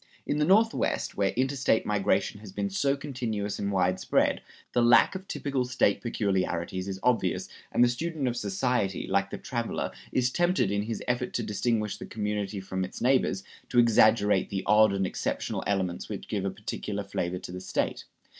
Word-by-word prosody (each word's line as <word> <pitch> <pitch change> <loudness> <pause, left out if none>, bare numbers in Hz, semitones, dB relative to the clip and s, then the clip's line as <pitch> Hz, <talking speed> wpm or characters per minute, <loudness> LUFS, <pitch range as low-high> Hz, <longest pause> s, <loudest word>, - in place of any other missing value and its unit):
In 145 - -1
the 150 - +3
Northwest, 215 +6 +2
where 100 -1 +2
interstate 130 -2 +1
migration 105 0 +1
has 105 -2 -10
been 100 0 -2
so 140 +8 +1
continuous 115 -8 -3
and 100 0 -1
widespread, 90 -1 +1 0.3
the 120 - +3
lack 120 0 +6
of 190 0 -7
typical 135 -3 -1
State 125 -5 +1
peculiarities 95 -4 -1
is 95 -1 -4
obvious, 115 -8 +1 0.2
and - - +4
the - - +6
student 150 +3 -2
of 120 - -1
society, 100 -2 -1
like 100 0 +1
the - - -5
traveler, 120 -3 -3 0.2
is 125 0 +1
tempted, 175 - +2
in 100 0 +1
his 110 +2 -4
effort 125 0 -1
to 120 - -1
distinguish 105 0 -1
the - - -8
community 105 -1 -3
from 95 0 -3
its 95 - -6
neighbors, 125 -7 +2 0.3
to 125 - -2
exaggerate 110 -4 +4
the 95 -1 -3
odd 110 0 +5
and 95 -1 0
exceptional - - -2
elements 95 -3 -1
which - - -6
give 100 -2 -2
a - - +1
particular 100 0 -4
flavor 90 -2 -3
to 90 - -8
the 90 0 -6
State. 95 - -2
105 Hz, 180 wpm, -28 LUFS, 95-125 Hz, 0.3 s, lack